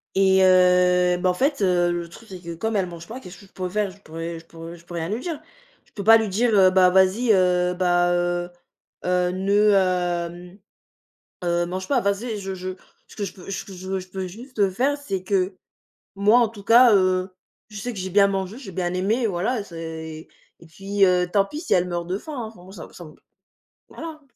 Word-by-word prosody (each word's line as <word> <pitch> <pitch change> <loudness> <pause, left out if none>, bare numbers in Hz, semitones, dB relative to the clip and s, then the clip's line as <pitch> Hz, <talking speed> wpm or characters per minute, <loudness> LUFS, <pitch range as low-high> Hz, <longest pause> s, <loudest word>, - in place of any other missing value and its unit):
et 190 0 +4
heu, 180 -1 +4
bah 185 0 +1
en - - +2
fait, 275 - 0
heu, 175 -2 +2
le 170 -1 -4
truc, 225 +6 -15
c'est 185 -1 -8
que 170 -1 -7
comme 220 +5 -2
elle 190 -2 +1
mange 170 -1 -10
pas, 245 +4 -7
qu'est-ce 180 -5 -12
que 200 - -15
je - - -24
pourrais 185 -1 -4
faire? 205 0 -1
Je 200 - -18
pourrais 165 0 -6
je 165 - -18
pourrais 165 +1 -10
je 170 - -20
peux 175 - -11
rien 165 +1 -3
lui 220 +3 -2
dire. 320 0 -5 0.5
Je - - -30
peux 200 - -6
pas 225 +1 +8
lui 220 -2 -2
dire, 225 +5 +1
heu: 190 -1 +6
«Bah 185 -1 +5
vas-y, 190 +6 +3
heu, 180 -1 +2
bah, 175 -1 +2
heu, 175 0 -1 0.6
heu, 180 0 +1
ne, 200 +3 +2
hem, 180 -1 -1 0.8
heu, 175 0 +1
mange 185 +2 -5
pas». 260 -4 +2
Vas-y, 205 +2 -2
je 195 0 -5
je 185 0 -6 0.4
ce - - -16
que 205 - -4
je 190 - -7
peux 190 -1 -12
ce 195 - -4
que 195 - -11
je 185 +1 -9
veux 190 0 -1
je 185 0 -11
peux 190 0 -5
juste 215 0 -2
faire, 270 +9 0
c'est 195 -10 -4
que, 190 -1 0 0.6
moi 210 +4 +4
en 230 - +3
tout 205 -2 -12
cas, 235 0 +7
heu, 185 -1 +2 0.4
je 210 - -8
sais 245 +2 -4
que 200 - -8
j'ai 190 0 -4
bien 200 +1 +5
mangé, 195 +3 -3
j'ai 210 -8 -10
bien 175 0 -2
aimé, 215 +6 0
voilà, 205 +5 -1
c'est 160 -2 -8 0.3
et 170 - -15
puis, 195 +5 0
heu, 180 -1 +2
tant 200 0 +3
pis, 295 +10 -7
si 335 - 0
elle 180 0 +2
meurt 175 -1 -3
de 185 - -2
faim, 310 - -9
hein 235 -3 -4
enfin, 180 - -17
moi 190 - -14
ça 190 - -9
m - - -15
ça 175 - -11
m 155 - -13 0.8
voilà. 320 -2 -9
185 Hz, 235 wpm, -23 LUFS, 180-205 Hz, 0.8 s, pas